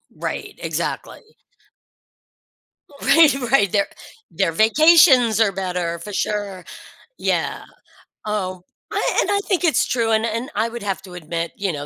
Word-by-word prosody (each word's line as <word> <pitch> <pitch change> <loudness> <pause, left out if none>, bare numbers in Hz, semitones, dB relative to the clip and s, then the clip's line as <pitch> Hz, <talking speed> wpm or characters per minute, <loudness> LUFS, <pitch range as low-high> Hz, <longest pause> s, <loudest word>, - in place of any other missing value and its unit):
Right, - - -5
exactly. 445 - -5 1.7
Right, 315 -4 +5 0.2
right. 200 -9 +3
Their 200 -1 +1 0.4
their 190 -4 0
vacations 250 - +5
are 215 -3 +3
better 180 -3 -3
for 205 +4 -9
sure. 200 -3 -3 0.5
Yeah. - - -2 0.6
Oh, 185 -4 -3 0.3
I - - -1
and - - -2
I 400 - +2
think 365 -3 0
it's 320 - +3
true, 230 -2 0
and 220 +1 +2
and 230 +3 -3
I 220 +2 0
would 235 -2 -8
have 195 -2 -3
to 185 -2 -12
admit, 170 0 -4
you 195 -2 -1
know, 145 0 -6
210 Hz, 140 wpm, -20 LUFS, 185-240 Hz, 1.7 s, Right